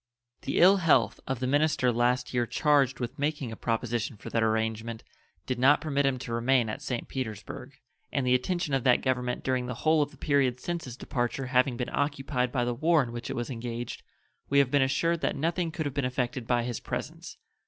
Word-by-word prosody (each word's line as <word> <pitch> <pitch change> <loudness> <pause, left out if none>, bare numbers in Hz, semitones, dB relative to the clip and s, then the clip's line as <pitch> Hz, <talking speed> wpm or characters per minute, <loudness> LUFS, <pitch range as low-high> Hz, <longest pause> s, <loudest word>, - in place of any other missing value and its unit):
The 140 - -2
ill 190 +3 +7
health 160 -9 +3
of 130 -2 -2
the 130 - -1
minister 145 -1 +2
last 125 +2 +1
year 120 -1 +1
charged 140 -2 +2
with 125 +3 -5
making 145 -4 -1
a - - -6
proposition 115 -1 -2
for - - -9
that 115 - +1
arrangement 110 +1 -1 0.4
did 130 -2 -2
not 140 +4 +5
permit 140 -2 0
him 135 -1 +1
to 120 -2 -6
remain 120 0 +2
at 110 - -5
St. 130 -5 -4
Petersburg, 110 -6 -6 0.4
and 135 -2 0
the 125 - +3
attention 155 +4 0
of 135 -2 +1
that 125 -2 +4
Government 125 -2 -1
during 130 -1 0
the 125 - -4
whole 155 0 +5
of 145 - 0
the - - -18
period 135 -4 +1
since 170 +2 -4
his 125 -1 -8
departure 125 +1 -2
having 125 -1 +3
been 125 0 -4
occupied 135 -3 -1
by 125 -2 0
the 120 - 0
war 155 +4 +3
in 120 - -6
which 120 0 -6
it - - -3
was 120 +3 -3
engaged, 120 0 -5 0.5
we 140 - +2
have 140 -2 +4
been 145 - +4
assured 165 +5 +1
that - - 0
nothing 165 +4 -1
could 160 -1 -4
have 145 - -2
been 140 - -1
effected 125 -1 -2
by 120 -1 +2
his 120 -1 -3
presence. - - -6
130 Hz, 215 wpm, -28 LUFS, 120-145 Hz, 0.5 s, ill